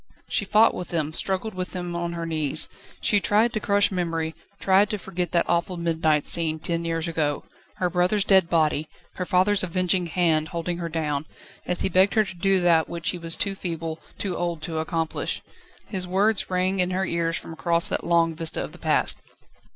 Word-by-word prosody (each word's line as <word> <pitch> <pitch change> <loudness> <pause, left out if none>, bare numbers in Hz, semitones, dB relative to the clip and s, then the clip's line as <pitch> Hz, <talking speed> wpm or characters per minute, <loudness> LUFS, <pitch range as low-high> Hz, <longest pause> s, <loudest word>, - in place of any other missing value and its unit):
She 205 - 0
fought 215 +3 +5
with 180 - -5
them, 155 -2 -2
struggled 195 +5 -1
with 185 0 -5
them 175 -2 -4
on 170 0 -2
her 170 -1 -4
knees. 155 -2 +2 0.3
She 205 - +3
tried 215 +4 +2
to 215 - -1
crush 205 -1 +3
memory, 165 -3 -2 0.3
tried 195 +2 +4
to 210 - -2
forget 180 -3 -4
that 170 - +3
awful 170 +1 0
midnight 160 -3 +1
scene 160 -2 +1
ten 170 +1 -2
years 165 0 -1
ago, 155 -3 -1 0.3
her 180 - 0
brother's 180 +3 +1
dead 190 -4 +4
body, 155 -2 +1 0.3
her 180 - -2
father's 190 +1 +3
avenging 185 0 +1
hand 160 -3 +1
holding 170 +1 -3
her 170 -1 -3
own, 150 -2 -1 0.4
as 180 - -2
he - - +2
begged 190 +2 +3
her 215 - +5
to 190 -3 -8
do 195 +2 +2
that, 170 -2 +3
which 170 -1 -2
he 180 - -6
was 165 0 +1
too 200 - +1
feeble, 165 -4 -4 0.2
too 190 -3 -2
old 170 -3 -3
to 160 -2 -3
accomplish. 160 0 -2 0.4
His 185 -3 -3
words 200 +3 +1
rang 185 +1 0
in 180 0 +2
her 185 +1 -1
ears 170 -1 -1
from 165 - -8
across 170 +1 0
that - - -1
long 170 -1 +2
vista 160 0 -1
of - - -7
the - - -14
past. - - +3
175 Hz, 200 wpm, -24 LUFS, 165-190 Hz, 0.4 s, fought